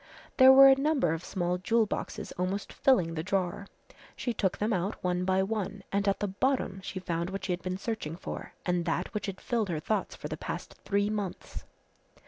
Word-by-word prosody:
There 260 0 +9
were 270 +1 +10
a 270 - +9
number 275 - +1
of 165 +1 -4
small 180 -1 -1
jewel 225 +4 +2
boxes - - -5
almost 185 +3 -3
filling 185 -12 +3
the 160 - -2
drawer. 190 +2 -1 0.5
She 240 - -2
took 190 -4 0
them 215 +2 0
out 190 +3 -1
one 180 0 0
by 190 0 +2
one 200 -1 -3
and 200 +1 0
at 200 - +2
the 205 - +1
bottom 200 -1 0
she 190 0 -5
found 170 -1 -2
what 195 0 -5
she 190 - -1
had 175 - -4
been 185 0 -3
searching 195 -7 -4
for 180 - -7
and 175 -1 0
that 175 +4 -1
which 210 -1 -3
had 190 -1 -5
filled 230 -5 -1
her 160 -3 -1
thoughts 205 +5 -2
for - - -6
the - - -5
past - - -6
three 205 +1 +1
months. 205 -4 -5
195 Hz, 210 wpm, -29 LUFS, 180-215 Hz, 0.5 s, were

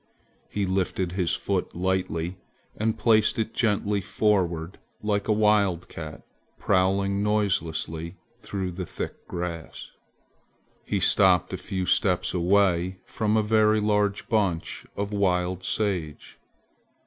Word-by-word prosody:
He 100 -1 -1
lifted 95 -1 -1
his 90 -2 0
foot - - -2
lightly 90 -1 -1 0.4
and 110 +1 -1
placed 110 -2 +3
it 110 0 -2
gently 105 -3 +1
forward 95 -3 0 0.2
like 105 -1 0
a - - +2
wildcat 100 -7 +1 0.3
prowling 100 +1 +1
noiselessly 85 -5 -1 0.2
through 95 -2 -4
the 90 0 -5
thick - - -6
grass. 85 -2 -6 0.9
He - - -1
stopped 95 -3 +4
a - - 0
few 95 -1 -3
steps 95 0 +1
away 95 0 +2
from 110 -2 0
a 110 - +3
very 110 0 +3
large 105 -1 +1
bunch 100 -7 -1
of 100 +1 -3
wild 90 -2 0
sage. 90 -7 -3
95 Hz, 115 wpm, -26 LUFS, 90-105 Hz, 0.9 s, stopped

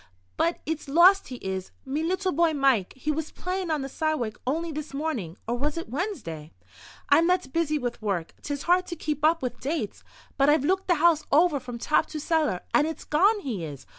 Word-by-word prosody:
But 335 +1 0
it's 315 -1 -3
lost 355 +7 +6
he 255 - -6
is, 190 -1 -3 0.2
me 275 +3 -2
little 370 +3 0
boy 330 +1 +2
Mike. 270 -9 +2
He 280 +4 -2
was 310 +1 -3
playin' 365 -1 -3
on 305 -3 0
the - - -3
sidewalk 275 -7 -2
only 325 +5 -1
this 305 -2 -6
mornin'—or 235 - -3
was 290 +5 -2
it 335 - -5
Wednesday? 205 - -4 0.6
I'm 335 - +5
that 360 -7 0
busy 320 -2 +1
with 245 -4 -4
work, 190 -6 -2
'tis 285 -1 -4
hard 360 +1 +3
to 345 - -5
keep 300 -2 -3
up 325 0 +3
with 250 - -3
dates. 270 -6 -3 0.3
But 275 +1 +4
I've 295 -2 +3
looked 380 +3 +1
the 350 - +4
house 320 -1 +4
over 310 -1 +4
from 245 -2 -7
top 305 +6 +2
to 310 - -6
cellar, 305 - 0
and 300 - +4
it's 320 - -5
gone 400 +8 +3
he 225 - -4
is. 145 -4 -7
300 Hz, 205 wpm, -26 LUFS, 255-335 Hz, 0.6 s, lost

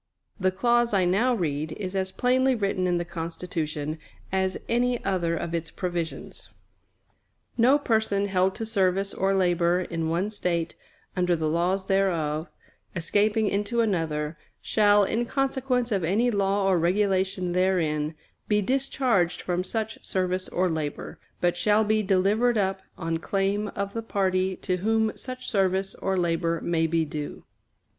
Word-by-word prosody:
The 185 -1 +3
clause 235 +3 +2
I 185 -2 +3
now 225 +8 +2
read 155 -5 -2
is 190 +1 -5
as 190 0 -1
plainly 255 +4 +2
written 195 -4 0
in 175 -1 +1
the 175 - -2
Constitution 160 -3 -4 0.3
as 190 0 0
any 245 +1 0
other 175 -4 0
of 165 - -4
its 165 -1 -2
provisions: 175 -3 -5 1.1
"No 250 +5 +5
person 220 -6 +1
held 190 -1 +1
to 225 - -4
service 195 -2 +1
or 195 +1 +1
labor 175 -1 +2
in 165 -2 -3
one 180 +6 0
State 175 -5 -1 0.4
under 180 -1 +2
the 160 -1 -1
laws 180 +4 0
thereof, 170 -5 0 0.5
escaping 210 +5 +1
into 205 +4 0
another, 160 -7 -1 0.2
shall, 205 -1 +4
in 230 +4 0
consequence 265 -2 0
of 195 -4 +1
any 215 +9 +2
law 200 -1 +1
or 185 -3 +3
regulation 190 0 +1
therein, 165 -4 +1 0.3
be 210 -1 +3
discharged 245 -6 +1
from 180 0 -1
such 220 +3 -3
service 185 0 -1
or 185 +1 +1
labor, 155 -4 -4 0.2
but 175 0 +2
shall 210 +4 +3
be 215 0 +2
delivered 210 +5 +2
up 190 -1 0 0.2
on 165 -1 -2
claim 195 +3 0
of 200 0 -3
the 230 - -2
party 190 -3 0
to 185 0 -2
whom 220 +3 +1
such 255 0 -7
service 195 -1 +1
or 190 -1 -2
labor 170 -1 0
may 165 -1 +1
be 165 0 +1
due." 150 0 -6
190 Hz, 150 wpm, -26 LUFS, 170-210 Hz, 1.1 s, No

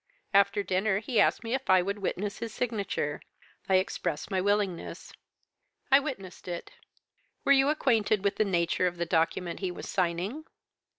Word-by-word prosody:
After 200 +1 +4
dinner 190 +1 +1
he 225 +2 0
asked - - +3
me 230 +1 -3
if 265 0 -3
I 185 -1 +6
would 200 +2 -3
witness 200 +1 -3
his 230 0 -4
signature. 205 -11 -2 0.5
I 190 - +5
expressed 185 -2 -1
my 190 -1 +1
willingness. 200 -3 -1 0.8
I 270 - +8
witnessed 200 -14 -7
it.' 175 -1 -5 0.7
"'Were 280 - +4
you 275 0 +5
acquainted 225 -9 +2
with 200 - 0
the - - +4
nature 175 -1 +1
of 175 0 -4
the 170 - -1
document 170 +1 0
he 190 - -2
was 180 - -7
signing?' 185 - -1
200 Hz, 165 wpm, -29 LUFS, 180-220 Hz, 0.8 s, I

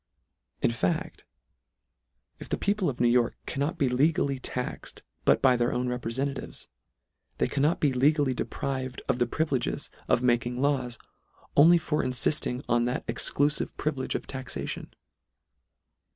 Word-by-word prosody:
In - - +4
fact, 90 -6 -2 1.1
if - - -9
the - - 0
people 200 -3 +1
of 125 - -5
New 120 - +4
York 120 0 +3
cannot 145 +6 -2
be 140 -5 +2
legally 140 +2 +2
taxed 125 0 -5 0.2
but - - +4
by 130 -2 +6
their 120 0 +1
own 125 +1 -1
reprefentatives, 125 +3 -3 0.7
they - - +1
can 140 - -2
not 150 +4 +2
be 145 -3 +2
legally 140 +1 +3
deprived 130 0 -4
of 125 - 0
the 120 - +2
privileges 145 -1 -1 0.2
of 125 - +2
making 120 0 +1
laws, 130 -4 0 0.6
only 165 +4 +7
for 155 -2 -1
infilling 130 0 +1
on 120 0 +2
that 125 +1 -2
ex - - -1
clufive 145 +1 0
privilege 140 -4 -2
of - - -3
taxation. 130 -1 -5
130 Hz, 145 wpm, -28 LUFS, 125-145 Hz, 1.1 s, only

